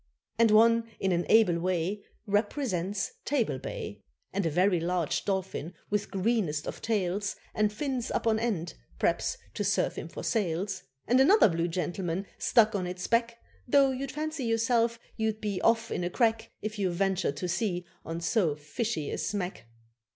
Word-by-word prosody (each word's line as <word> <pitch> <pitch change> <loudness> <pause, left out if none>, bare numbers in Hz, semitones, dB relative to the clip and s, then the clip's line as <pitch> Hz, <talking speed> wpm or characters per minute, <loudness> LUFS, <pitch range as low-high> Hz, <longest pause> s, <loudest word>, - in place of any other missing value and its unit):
And 230 -1 +6
one 230 +1 +5
in 190 - +1
an 175 0 0
able 210 -7 +5
way 185 +3 -1 0.2
Represents 205 - -1
Table 240 - 0
Bay, - - -6 0.3
And 195 -3 0
a - - +2
very 180 +3 +3
large 170 -1 -1
dolphin 190 -4 -2 0.2
with 210 0 0
greenest 190 -7 0
of - - -5
tails, 200 -2 -1 0.2
And 210 -1 +2
fins 255 +1 -2
up - - -1
on 220 -1 +3
end, 200 -8 -1 0.2
p'r'aps - - +1 0.2
to - - -2
serve - - +1
him - - -5
for - - -8
sails, 190 -2 -1 0.2
And 250 +3 +4
another 350 - +7
blue 165 0 0
gentleman 175 +1 -2
stuck 220 -1 +4
on 185 -3 -1
its 180 0 -4
back, 235 0 +1 0.3
Though 275 +1 +5
you'd 265 +1 -4
fancy 310 -3 -3
yourself 230 0 +2 0.2
you'd 220 -1 0
be 205 -4 -2
off 230 0 +2
in - - -1
a 175 - 0
crack 225 +2 +1
If 215 0 -4
you 190 -2 +1
ventured 185 -4 0
to 180 - -2
sea 180 -2 -1 0.2
on 165 +1 -5
so 170 -4 +2
fishy 155 - -3
a - - -3
smack. 185 - -3
205 Hz, 170 wpm, -29 LUFS, 180-230 Hz, 0.3 s, another